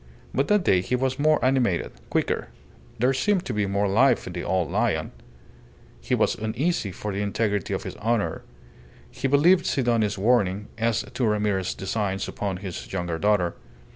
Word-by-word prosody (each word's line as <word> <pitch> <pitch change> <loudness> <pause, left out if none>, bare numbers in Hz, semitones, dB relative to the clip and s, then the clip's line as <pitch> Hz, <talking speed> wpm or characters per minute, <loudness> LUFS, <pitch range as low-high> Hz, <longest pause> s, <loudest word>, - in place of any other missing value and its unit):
But 135 - +1
that 210 -2 +3
day 90 - +3
he 125 - -1
was 130 +1 -1
more 155 +1 +4
animated, 125 -9 +1 0.2
quicker; - - 0 0.5
there 125 +3 +2
seemed 190 +6 +1
to - - -3
be 105 -1 0
more 100 +1 +1
life 120 +8 +3
in - - -6
the - - -4
old 90 -4 0
lion. - - 0 0.9
He - - 0
was - - +2
uneasy 110 - -1
for 105 +3 -5
the 100 - -2
integrity 105 -1 -1
of - - -4
his - - -6
honour. 105 -6 -1 0.7
He 135 - -2
believed 170 +6 +4
Sidoni's 115 -6 +1
warning 105 -2 +1
as 115 -1 0
to 125 - -2
Ramirez's 105 -3 0
designs 95 0 -2
upon 100 -3 -3
his 90 - -6
younger 85 -3 -2
daughter. 100 -4 +2
105 Hz, 170 wpm, -25 LUFS, 95-130 Hz, 0.9 s, more